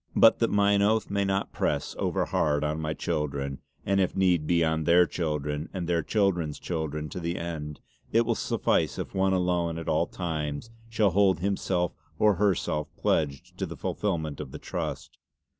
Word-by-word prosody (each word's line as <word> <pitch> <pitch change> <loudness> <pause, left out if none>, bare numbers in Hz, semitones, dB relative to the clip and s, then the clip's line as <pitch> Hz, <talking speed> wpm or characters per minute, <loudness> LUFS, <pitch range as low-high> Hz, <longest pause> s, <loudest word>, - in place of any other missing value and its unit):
But - - +6
that - - +2
mine 100 0 +3
oath 110 +1 +2
may 100 0 +1
not 95 0 -1
press - - -1
overhard 75 0 +1
on 75 +1 -1
my 80 0 -2
children, 70 -2 -2 0.3
and 100 0 +2
if 95 - 0
need 90 -5 +2
be 85 -1 +3
on 80 0 0
their 90 +1 +6
children 75 -2 -2
and 90 -3 -3
their 85 -1 +2
children's 85 -5 0
children 75 -3 -3
to 90 - -5
the 85 0 -2
end, 75 -3 -5 0.3
it 115 +1 +4
will 115 - +2
suffice - - 0
if - - -5
one 95 0 +2
alone 90 -2 +1
at 85 - -6
all 80 +2 +2
times 80 +2 -4 0.2
shall 110 -3 +2
hold 95 -2 +3
himself 95 -2 0 0.2
or 105 -3 +4
herself 85 -6 +1
pledged 70 -4 -1
to - - -1
the - - -8
fullfillment 80 -8 -2
of 75 -3 -5
the - - -6
Trust. - - -5
85 Hz, 175 wpm, -27 LUFS, 75-95 Hz, 0.3 s, But